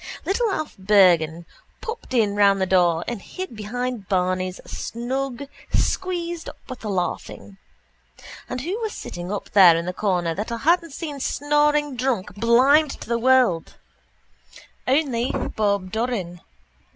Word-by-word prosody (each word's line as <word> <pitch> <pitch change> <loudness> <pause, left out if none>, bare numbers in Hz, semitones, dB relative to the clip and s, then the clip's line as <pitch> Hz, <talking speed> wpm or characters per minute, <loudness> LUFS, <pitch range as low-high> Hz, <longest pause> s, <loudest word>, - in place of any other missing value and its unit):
Little 445 +4 +1
Alf 310 -6 -3
Bergan 175 -5 +4 0.3
popped 455 - -7
in 210 -4 +2
round 200 -1 +4
the 190 - +2
door 175 -3 +3
and 235 -4 -4
hid 370 - -7
behind 235 0 -4
Barney's 185 0 0
snug, 260 +2 -4 0.3
squeezed 345 -2 -1
up - - -12
with 255 -1 -7
the 215 - -5
laughing. 140 - -4 0.9
And 250 0 -3
who 365 - -3
was 440 -2 -3
sitting 175 +2 -7
up 205 - -5
there 180 -5 +7
in 170 - -3
the 180 - -3
corner 180 -4 0
that 210 +6 -4
I 235 - -2
hadn't 330 +4 +1
seen 295 -2 -6
snoring 295 0 +1
drunk 235 -7 -1
blind 255 +8 +4
to - - -8
the 235 0 0
world 250 -9 +3 1.1
only 260 -3 +1 0.3
Bob 200 -3 0
Doran. 220 -7 -3
230 Hz, 140 wpm, -23 LUFS, 185-280 Hz, 1.1 s, there